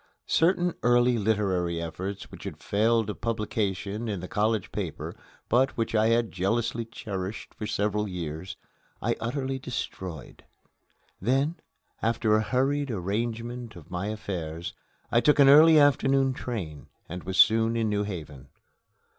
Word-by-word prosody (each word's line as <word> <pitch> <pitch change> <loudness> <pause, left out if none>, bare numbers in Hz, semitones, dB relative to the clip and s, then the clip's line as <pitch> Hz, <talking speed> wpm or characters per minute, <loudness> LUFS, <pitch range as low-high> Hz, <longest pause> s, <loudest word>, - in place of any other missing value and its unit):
Certain 175 +1 +2
early 120 0 +4
literary 95 -5 0
efforts 95 +4 -5
which - - -11
had - - -6
failed 110 +1 +1
of - - -11
publication 105 -1 -2
in 100 -3 -2
the 90 - -6
college 105 0 0
paper, - - -4 0.3
but 130 +3 +2
which 115 -1 -1
I 110 0 +4
had 115 0 +2
jealously 115 +5 -1
cherished 100 -3 -6
for 105 - -5
several 105 +1 0
years, 85 -1 -5 0.4
I - - 0
utterly 130 +3 -2
destroyed. 95 - -6 0.8
Then, 135 - +1 0.4
after 110 -1 +1
a 110 - +3
hurried 135 +6 0
arrangement 115 +3 -3
of 85 -1 -13
my 90 +3 -2
affairs, 85 -5 -4 0.4
I 120 - +4
took 150 - +4
an 140 -2 +7
early 155 +3 +8
afternoon 135 -2 +4
train, 95 - -5 0.2
and 90 +2 -7
was 95 +1 -4
soon 115 +1 +5
in 115 -1 +1
New 105 -1 0
Haven. 75 -9 -6
110 Hz, 140 wpm, -27 LUFS, 95-120 Hz, 0.8 s, early